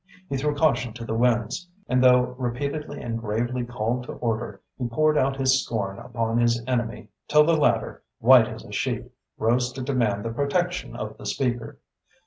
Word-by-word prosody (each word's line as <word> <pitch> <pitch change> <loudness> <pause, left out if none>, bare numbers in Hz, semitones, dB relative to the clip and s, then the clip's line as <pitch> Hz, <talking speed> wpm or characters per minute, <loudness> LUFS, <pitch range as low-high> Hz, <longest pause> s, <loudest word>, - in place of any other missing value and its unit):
He 140 - -2
threw 145 +2 0
caution 125 -6 +1
to 115 0 -7
the 110 - -3
winds, 120 +7 +1 0.2
and 125 0 +2
though 125 0 +5
repeatedly 140 +5 -3
and 115 -1 -3
gravely 120 +3 -2
called 120 +1 -2
to - - -6
order, 115 -3 -3 0.2
he 125 - -3
poured 155 +6 +2
out 135 -1 +2
his 130 -1 +3
scorn 100 -4 -3
upon 115 -1 -1
his 120 0 +3
enemy 120 -2 -2 0.2
till 150 0 +6
the 165 +2 +3
latter, 120 -7 +1 0.2
white 120 -1 +7
as 110 -1 -8
a - - -12
sheet, 125 0 -2 0.3
rose 125 +3 +1
to 130 - -5
demand 115 -7 0
the 115 - -2
protection 175 +7 -1
of 110 0 -6
the - - -7
Speaker. 120 -4 -2
120 Hz, 180 wpm, -25 LUFS, 115-130 Hz, 0.3 s, white